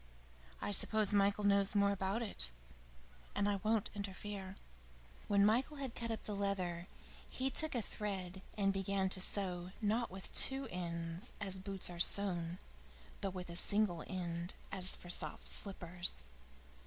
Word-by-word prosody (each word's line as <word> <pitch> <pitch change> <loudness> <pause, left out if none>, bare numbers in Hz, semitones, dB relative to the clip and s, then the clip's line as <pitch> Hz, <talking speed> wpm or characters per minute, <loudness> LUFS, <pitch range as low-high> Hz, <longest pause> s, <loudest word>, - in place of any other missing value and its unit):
I - - -1
suppose 210 +1 +4
Michael 200 +1 +3
knows 200 0 +3
more 200 0 +4
about 200 +4 -1
it 130 - 0 0.9
and 205 - +1
I 205 -1 +1
won't 215 +1 0
interfere." 200 -1 -6 0.7
When 200 -1 +4
Michael 250 +8 +2
had 270 -4 -4
cut 230 -1 -4
up 225 -2 -3
the 210 - -3
leather, 185 -3 -2 0.4
he 265 +1 -1
took 315 -1 +1
a 235 - 0
thread 190 -3 -4 0.2
and 195 -1 +2
began 195 0 0
to 185 - +1
sew 180 -2 0
not 225 +2 +1
with 190 +1 -8
two 270 0 +3
ends, 170 0 -4
as 195 -2 -1
boots 195 0 +2
are 175 -1 -5
sewn, 175 -2 +5 0.6
but 195 -2 -3
with 180 -1 -6
a - - -6
single 195 -3 +1
end, 175 -2 -4 0.2
as 190 -1 +2
for 175 - -6
soft - - +3
slippers. 175 - 0
195 Hz, 155 wpm, -36 LUFS, 180-205 Hz, 0.9 s, sewn